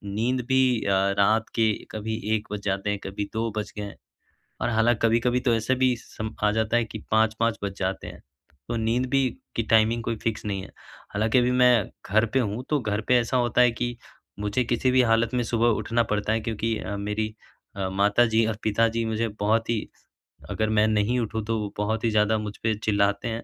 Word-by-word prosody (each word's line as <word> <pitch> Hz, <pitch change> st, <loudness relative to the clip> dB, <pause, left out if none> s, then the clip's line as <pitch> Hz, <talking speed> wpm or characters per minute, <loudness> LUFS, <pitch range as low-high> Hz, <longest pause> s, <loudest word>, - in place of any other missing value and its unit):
नींद 125 Hz, +4 st, 0 dB
भी 130 Hz, -3 st, +3 dB
अ, -, -, 0 dB, 0.3 s
रात 110 Hz, +3 st, +3 dB
के 110 Hz, -2 st, +3 dB, 0.2 s
कभी 110 Hz, +1 st, -4 dB, 0.2 s
1 110 Hz, 0 st, -4 dB
बज 105 Hz, -, -4 dB
जाते 100 Hz, +1 st, -1 dB
हैं, 105 Hz, -1 st, -1 dB
कभी 100 Hz, +1 st, -4 dB
2 115 Hz, +1 st, -1 dB
बज 105 Hz, -, -3 dB
गए 105 Hz, -, -3 dB
हैं 100 Hz, -, -8 dB, 0.7 s
और -, -, +1 dB
हालाँ 115 Hz, +1 st, +3 dB
कभी-कभी 120 Hz, +2 st, +2 dB
तो 125 Hz, -2 st, +2 dB
ऐसे 115 Hz, +3 st, +1 dB
भी 130 Hz, -1 st, +4 dB
सम 110 Hz, -2 st, -7 dB
आ 105 Hz, -, +4 dB
जाता 110 Hz, +1 st, +1 dB
है 120 Hz, -, +2 dB
कि 110 Hz, -1 st, -8 dB
5-5 110 Hz, +1 st, +2 dB
बज 100 Hz, -1 st, -3 dB
जाते 95 Hz, 0 st, -2 dB
हैं। -, -, -10 dB, 0.5 s
तो 120 Hz, -, -2 dB
नींद 115 Hz, +3 st, 0 dB
भी 135 Hz, -2 st, +3 dB, 0.3 s
की 115 Hz, -, +1 dB
टाइमिंग 110 Hz, +1 st, +3 dB
कोई 115 Hz, -1 st, -2 dB
फ़िक्स 115 Hz, -1 st, -2 dB
नहीं 100 Hz, -2 st, -2 dB
है। -, -, -12 dB, 0.4 s
हालाँकि 110 Hz, +4 st, +2 dB
अभी 125 Hz, 0 st, +3 dB
मैं 125 Hz, -5 st, +4 dB, 0.2 s
घर 110 Hz, +3 st, +4 dB
पे -, -, +4 dB
हूँ 110 Hz, +2 st, -3 dB
तो 150 Hz, -2 st, +2 dB
घर 105 Hz, -3 st, -1 dB
पे 125 Hz, -1 st, +5 dB
ऐसा 120 Hz, +2 st, -1 dB
होता 120 Hz, 0 st, +1 dB
है 125 Hz, -, +5 dB
कि 120 Hz, 0 st, -2 dB, 0.4 s
मुझे 105 Hz, +5 st, 0 dB
किसी 120 Hz, +2 st, +1 dB
भी 130 Hz, 0 st, +4 dB
हालत 115 Hz, +2 st, +1 dB
में 125 Hz, -1 st, +1 dB
सुबह 115 Hz, 0 st, +1 dB
उठना 115 Hz, +2 st, +1 dB
पड़ता 105 Hz, +1 st, 0 dB
है 110 Hz, -, +1 dB
क्योंकि 115 Hz, 0 st, -2 dB
अ, 100 Hz, -1 st, -4 dB
मेरी 105 Hz, +2 st, -3 dB, 0.4 s
अ, 95 Hz, -1 st, -2 dB
माताजी 110 Hz, +3 st, +3 dB
और 110 Hz, -2 st, -2 dB
पिताजी 115 Hz, +2 st, +1 dB
मुझे 110 Hz, +1 st, -1 dB
बहुत 110 Hz, +2 st, +1 dB
ही 115 Hz, -3 st, -1 dB, 0.6 s
अगर 110 Hz, -1 st, -1 dB
मैं 110 Hz, 0 st, +3 dB
नहीं 110 Hz, +3 st, +1 dB
उठूँ 110 Hz, -1 st, -2 dB
तो 115 Hz, +1 st, -1 dB
वो 105 Hz, -1 st, -5 dB
बहुत 110 Hz, +2 st, -1 dB
ही -, -, +3 dB
ज़्यादा 105 Hz, +1 st, +3 dB
मुझ 105 Hz, -1 st, -5 dB
पे 110 Hz, -1 st, +2 dB
चिल्लाते 100 Hz, -1 st, +1 dB
हैं। 115 Hz, 0 st, -4 dB
110 Hz, 215 wpm, -25 LUFS, 105-120 Hz, 0.7 s, पे